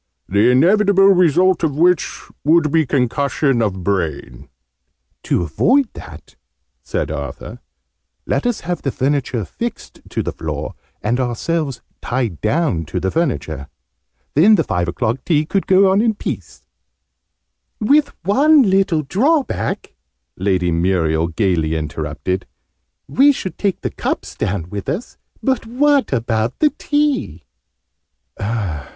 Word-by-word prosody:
"The 100 Hz, +5 st, +3 dB
inevitable 195 Hz, +8 st, +4 dB
result 180 Hz, -1 st, +3 dB
of 150 Hz, -4 st, 0 dB
which 175 Hz, -2 st, +2 dB, 0.2 s
would 155 Hz, 0 st, +3 dB
be 160 Hz, -2 st, +2 dB
concussion 135 Hz, 0 st, +1 dB
of 95 Hz, -4 st, -2 dB
brain." 75 Hz, -8 st, -3 dB, 0.8 s
"To -, -, +1 dB
avoid 230 Hz, -, +2 dB
that," -, -, -12 dB, 0.5 s
said -, -, -3 dB
Arthur, -, -, -6 dB, 0.7 s
"let -, -, 0 dB
us 245 Hz, -, -1 dB
have 175 Hz, +1 st, -3 dB
the 135 Hz, -, -1 dB
furniture 130 Hz, -5 st, -1 dB
fixed 235 Hz, -1 st, -6 dB
to -, -, -2 dB
the -, -, -3 dB
floor, -, -, -5 dB, 0.3 s
and 120 Hz, +4 st, 0 dB
ourselves 135 Hz, +3 st, -2 dB, 0.2 s
tied 120 Hz, -, -2 dB
down 120 Hz, -, 0 dB
to 90 Hz, -, -3 dB
the 95 Hz, +1 st, -1 dB
furniture. 80 Hz, -, -2 dB, 0.7 s
Then 195 Hz, +9 st, +6 dB
the 165 Hz, -, +2 dB
five 90 Hz, -, -1 dB
o'clock 120 Hz, +7 st, -2 dB
tea 155 Hz, -3 st, +1 dB
could 195 Hz, +4 st, -1 dB
go 190 Hz, 0 st, +5 dB
on 195 Hz, +2 st, +3 dB
in 225 Hz, -2 st, +1 dB
peace." -, -, -6 dB, 1.1 s
"With 280 Hz, +6 st, +3 dB
one 280 Hz, -, +5 dB
little 190 Hz, -6 st, +2 dB
drawback!" 260 Hz, -, 0 dB, 0.4 s
Lady 90 Hz, -2 st, 0 dB
Muriel 85 Hz, -2 st, +1 dB
gaily 80 Hz, -3 st, 0 dB
interrupted. 80 Hz, +4 st, -3 dB, 0.6 s
"We 280 Hz, +3 st, +5 dB
should 190 Hz, -9 st, -5 dB
take 200 Hz, -3 st, -1 dB
the -, -, -3 dB
cups -, -, -3 dB
down 90 Hz, -3 st, -3 dB
with 100 Hz, -1 st, -5 dB
us: 205 Hz, +10 st, -5 dB, 0.2 s
but 265 Hz, -4 st, 0 dB
what 280 Hz, +3 st, +2 dB
about 115 Hz, -2 st, -1 dB
the 300 Hz, -1 st, +3 dB
tea?" 290 Hz, -, 0 dB
145 Hz, 130 wpm, -18 LUFS, -, 1.1 s, Then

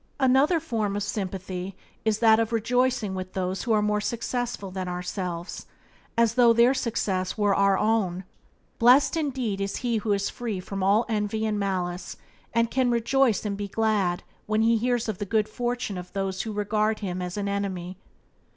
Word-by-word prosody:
Another 270 Hz, +6 st, +4 dB
form 220 Hz, -10 st, -2 dB
of 205 Hz, -, -1 dB
sympathy 190 Hz, -2 st, -4 dB, 0.3 s
is 220 Hz, -2 st, +2 dB
that 220 Hz, -1 st, +5 dB
of 225 Hz, 0 st, 0 dB
rejoicing 235 Hz, -2 st, +1 dB
with 185 Hz, 0 st, -5 dB
those 185 Hz, 0 st, -2 dB
who 235 Hz, -, -2 dB
are 215 Hz, -1 st, +3 dB
more 210 Hz, 0 st, +1 dB
successful 235 Hz, -2 st, -3 dB
than 185 Hz, -1 st, -4 dB
ourselves, 180 Hz, -1 st, -4 dB, 0.5 s
as 230 Hz, -1 st, +4 dB
though 240 Hz, -1 st, +6 dB
their 235 Hz, +3 st, +5 dB
success 200 Hz, -7 st, -1 dB
were 205 Hz, -2 st, +3 dB
our 200 Hz, 0 st, +3 dB
own. 200 Hz, -5 st, +1 dB, 0.6 s
Blessed 250 Hz, +7 st, +5 dB
indeed 255 Hz, -10 st, -2 dB
is 195 Hz, 0 st, -2 dB
he 235 Hz, -2 st, +1 dB
who 215 Hz, 0 st, -2 dB
is 200 Hz, 0 st, +1 dB
free 225 Hz, -6 st, -4 dB
from 195 Hz, +1 st, -5 dB
all 200 Hz, +5 st, +3 dB
envy 215 Hz, -1 st, -1 dB
and 210 Hz, -1 st, 0 dB
malice, 180 Hz, -2 st, -3 dB, 0.3 s
and 230 Hz, 0 st, +1 dB
can 255 Hz, -1 st, +2 dB
rejoice 235 Hz, -1 st, +2 dB
and 205 Hz, -1 st, -1 dB
be 205 Hz, 0 st, -4 dB
glad 200 Hz, -4 st, 0 dB, 0.2 s
when 215 Hz, +1 st, +2 dB
he 230 Hz, +1 st, +4 dB
hears 240 Hz, +1 st, 0 dB
of 215 Hz, -4 st, -3 dB
the -, -, -1 dB
good 215 Hz, +1 st, +1 dB
fortune 240 Hz, -3 st, -3 dB
of 180 Hz, 0 st, -10 dB
those 195 Hz, -1 st, -2 dB
who 225 Hz, -, -4 dB
regard 215 Hz, +1 st, 0 dB
him 185 Hz, -2 st, -3 dB
as 180 Hz, +2 st, -4 dB
an 200 Hz, -1 st, -2 dB
enemy. 190 Hz, -3 st, -3 dB
210 Hz, 180 wpm, -26 LUFS, 190-230 Hz, 0.6 s, though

